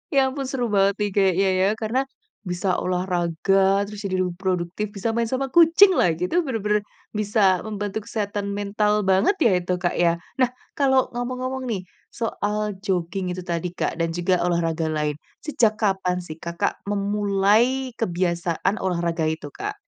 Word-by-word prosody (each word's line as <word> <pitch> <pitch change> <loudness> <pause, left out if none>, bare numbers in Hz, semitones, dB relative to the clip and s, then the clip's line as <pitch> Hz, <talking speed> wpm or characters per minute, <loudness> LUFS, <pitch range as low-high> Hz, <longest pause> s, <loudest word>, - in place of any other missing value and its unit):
Ya - - +6
ampun 270 0 -4
seru 255 -2 -1
banget 195 0 +3
nih 205 - +1
kayaknya 195 -1 +3
ya 190 - +4
karena 235 +5 +1 0.5
bisa 180 +1 0
olahraga, 185 +2 +1
terus 205 0 -8
jadi 185 -1 -1
lebih 180 0 -5
produktif 185 +2 -2
bisa 210 +4 -1
main 230 0 0
sama 260 +2 -2
kucing 340 +5 +7
lagi, 175 +1 +1
itu 350 - +3
bener-bener 210 -4 +1 0.3
bisa 205 -3 +2
membantu 205 -1 -4
kesehatan 205 -2 -3
mental 210 +1 +1
banget 190 - +3
ya 230 - +5
itu, 180 +1 -1
Kak, 175 -1 -1
ya. 170 -1 +4 0.2
Nah 255 - +5 0.3
kalau 265 -2 +3
ngomong-ngomong 255 +2 -3
nih 200 -5 -2 0.2
soal 210 -2 -2
jogging 185 -1 -2
itu 185 - -6
tadi, 170 0 -2
Kak, - - -2
dan 165 0 -1
juga 175 +1 +1
olahraga 165 -2 0
lain, 150 -1 -1 0.2
sejak 230 -8 +2
kapan 190 -4 0
sih 160 -1 -9
Kakak 170 +1 -2
memulai 205 +5 +2
kebiasaan 175 0 0
olahraga 170 -3 -1
itu, 155 -2 -4
Kak? - - -5
195 Hz, 155 wpm, -23 LUFS, 175-220 Hz, 0.5 s, kucing